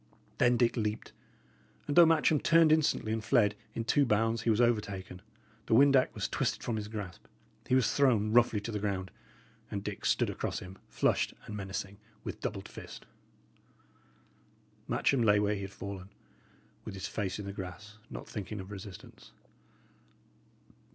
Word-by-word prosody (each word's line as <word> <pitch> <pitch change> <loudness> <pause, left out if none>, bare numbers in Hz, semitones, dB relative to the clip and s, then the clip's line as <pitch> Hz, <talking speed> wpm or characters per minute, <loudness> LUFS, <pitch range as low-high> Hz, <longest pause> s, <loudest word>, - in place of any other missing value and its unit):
Then 120 0 +4
Dick 120 -1 +2
leaped; 105 -2 -2 0.7
and 145 - -2
though 175 -1 +9
Matcham 155 -1 +3
turned 165 0 +5
instantly 155 -8 +2
and 110 -1 -2
fled, 110 -4 +3 0.2
in 115 - -2
two 140 +5 +3
bounds 115 -1 +1
he 115 - 0
was 110 0 +3
over 120 -3 +4
taken, 95 -3 -8 0.5
the - - +3
windac 135 0 +5
was - - -2
twisted - - -1
from 120 - -2
his 105 -1 -4
grasp, 105 -5 -7 0.4
he 130 - +3
was 130 -4 +3
thrown 115 -7 +3
roughly 120 -3 +4
to 115 - -5
the 105 - -2
ground, 95 -2 -2 0.6
and 100 -1 -4
Dick 105 -1 -6
stood - - +2
across - - -3
him, 95 +1 -9
flushed - - +1
and 105 - -7
menacing, 95 0 -5 0.3
with - - -6
doubled - - -4
fist. - - -10 1.8
Matcham 135 -3 +2
lay 105 -2 +5
where 105 0 +1
he 100 - -4
had 95 0 -6
fallen, 100 -1 -7 0.7
with - - -7
his 95 - -4
face 100 -3 -3
in 105 - -6
the 100 - -5
grass, 105 +3 -8
not - - -8
thinking 105 0 -6
of 95 +1 -8
resistance. 100 -2 -11
105 Hz, 165 wpm, -31 LUFS, 100-120 Hz, 1.8 s, though